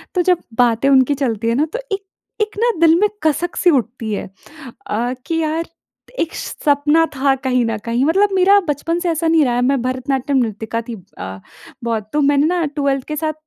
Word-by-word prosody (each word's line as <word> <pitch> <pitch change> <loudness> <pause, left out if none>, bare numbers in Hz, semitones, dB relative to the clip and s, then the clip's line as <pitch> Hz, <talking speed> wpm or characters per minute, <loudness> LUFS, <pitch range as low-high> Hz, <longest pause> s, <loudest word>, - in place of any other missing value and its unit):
तो 360 - +3
जब 355 -1 +1 0.2
बातें 240 +2 +3
उनकी 265 0 +4
चलती 230 -5 -2
है 230 - +1
ना 290 +4 +2
तो - - -2
एक 395 0 -3 0.4
एक 425 -1 -2
ना 475 +1 +3
दिल 330 -1 +6
में 420 - +4 0.2
कसक 315 +3 0
सी 360 - +3
उठती 235 -6 -1
है। 200 - -4 0.6
अ, 240 +4 -1
कि 330 - -1
यार 320 +1 -1 0.5
एक 330 - -1
श - - -5
सपना 295 +3 +3
था 270 +1 +2
कहीं 255 -2 +2
न 225 -1 -1
कहीं 235 +2 0
मतलब 390 +7 +3
मेरा 390 +2 +5
बचपन 330 +4 -1
से 350 0 -1
ऐसा 330 0 -1
नहीं 320 -2 +4
रहा 245 -2 0
है। 245 - +1
मैं 265 +1 +1
भरतनाट्यम 260 +2 -1
नृतिका 220 +1 -4
थी 235 - -4 0.2
अ, 95 +1 -7 0.4
बहुत। 220 -3 -2
तो 300 - +2
मैंने 285 +1 +3
ना 345 -1 0
12th 280 -2 -1
के 305 - -3
साथ 310 +1 -2
280 Hz, 210 wpm, -18 LUFS, 245-330 Hz, 0.6 s, दिल